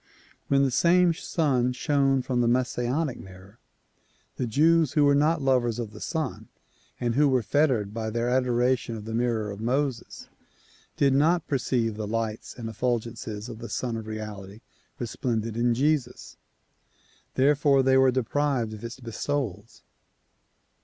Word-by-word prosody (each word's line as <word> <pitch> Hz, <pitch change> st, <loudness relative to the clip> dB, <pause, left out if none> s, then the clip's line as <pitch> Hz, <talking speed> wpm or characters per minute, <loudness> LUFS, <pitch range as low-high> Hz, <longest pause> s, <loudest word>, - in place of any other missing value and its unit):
When 140 Hz, 0 st, +3 dB
the 135 Hz, -, +1 dB
same 170 Hz, +5 st, +4 dB
Sun 135 Hz, -7 st, 0 dB
shone 135 Hz, -1 st, +1 dB
from 125 Hz, -1 st, 0 dB
the 120 Hz, -, +2 dB
Messianic 125 Hz, +3 st, 0 dB
mirror, 95 Hz, +3 st, -14 dB, 0.8 s
the 125 Hz, -, -2 dB
Jews 155 Hz, +4 st, +3 dB
who 150 Hz, -, +3 dB
were 145 Hz, 0 st, +5 dB
not 150 Hz, +1 st, +2 dB
lovers 125 Hz, -4 st, +2 dB
of 115 Hz, -3 st, -4 dB
the 110 Hz, -, -12 dB
Sun 110 Hz, -, -3 dB, 0.5 s
and 120 Hz, -1 st, 0 dB
who 145 Hz, +3 st, +4 dB
were 130 Hz, -3 st, +2 dB
fettered 120 Hz, -6 st, +1 dB
by 110 Hz, -1 st, -3 dB
their 115 Hz, +2 st, -1 dB
adoration 125 Hz, -1 st, +1 dB
of 105 Hz, -1 st, -8 dB
the 110 Hz, -, -5 dB
mirror 115 Hz, -3 st, 0 dB
of 100 Hz, +1 st, -8 dB
Moses 130 Hz, +1 st, -2 dB, 0.7 s
did 140 Hz, -1 st, +3 dB
not 155 Hz, +4 st, +2 dB
perceive 120 Hz, -5 st, -1 dB
the 110 Hz, -1 st, -4 dB
lights 110 Hz, 0 st, -3 dB
and 115 Hz, -2 st, -6 dB
effulgences 115 Hz, -2 st, -3 dB
of 115 Hz, -2 st, -8 dB
the 115 Hz, -1 st, -7 dB
Sun 120 Hz, +2 st, -2 dB
of 110 Hz, -1 st, -6 dB
Reality 105 Hz, -1 st, -7 dB, 0.4 s
resplendent 115 Hz, -2 st, -3 dB
in 120 Hz, 0 st, +1 dB
Jesus, 140 Hz, -1 st, -1 dB, 1.0 s
therefore 140 Hz, 0 st, +3 dB
they 130 Hz, 0 st, +4 dB
were 130 Hz, 0 st, +5 dB
deprived 130 Hz, -2 st, 0 dB
of 110 Hz, -, -10 dB
its 115 Hz, +2 st, -7 dB
bestowals. 115 Hz, -3 st, -4 dB
125 Hz, 150 wpm, -26 LUFS, 115-140 Hz, 1.0 s, were